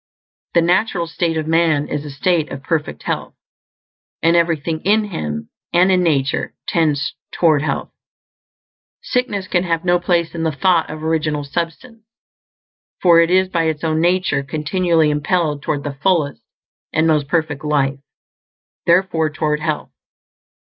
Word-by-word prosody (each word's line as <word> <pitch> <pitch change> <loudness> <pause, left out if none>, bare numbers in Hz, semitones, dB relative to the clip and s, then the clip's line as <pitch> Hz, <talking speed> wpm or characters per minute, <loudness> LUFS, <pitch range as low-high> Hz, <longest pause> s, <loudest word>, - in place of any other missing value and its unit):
The 170 - +5
natural 180 0 +1
state 165 0 -1
of 155 - -2
man 160 -2 +2
is 150 -1 -3
a - - -6
state 155 +3 0
of 135 0 -7
perfect 150 - -2
health; - - -3 0.9
and 165 +1 +4
everything 165 -2 +1
in 215 +3 +3
him, 75 - -5 0.2
and 180 +2 +4
in 185 -1 +3
nature, 145 -6 0
tends 150 -4 +1 0.2
toward 155 -4 +3
health. 145 -2 -2 1.1
Sickness 210 -7 -1
can 175 -1 +1
have 165 -1 -1
no 175 0 +3
place 170 -2 0
in 165 - -4
the 160 -1 +1
thought 170 +2 +2
of 155 0 -7
Original 155 -2 0
Substance, 170 - -5 1.0
for 170 -2 +6
it 170 0 +4
is 185 +1 +3
by 165 -3 0
its 160 -1 -2
own 160 -1 +1
nature 175 -4 +1
continually 155 +3 +1
impelled 150 0 0
toward 145 -1 -2
the 145 - -4
fullest 160 -6 +1 0.5
and 155 - +2
most 150 -3 +2
perfect 155 -3 -1
life; 140 -2 0 0.9
therefore, 170 -3 +3
toward 150 0 -1
health. 155 -1 -3
160 Hz, 145 wpm, -19 LUFS, 150-175 Hz, 1.1 s, for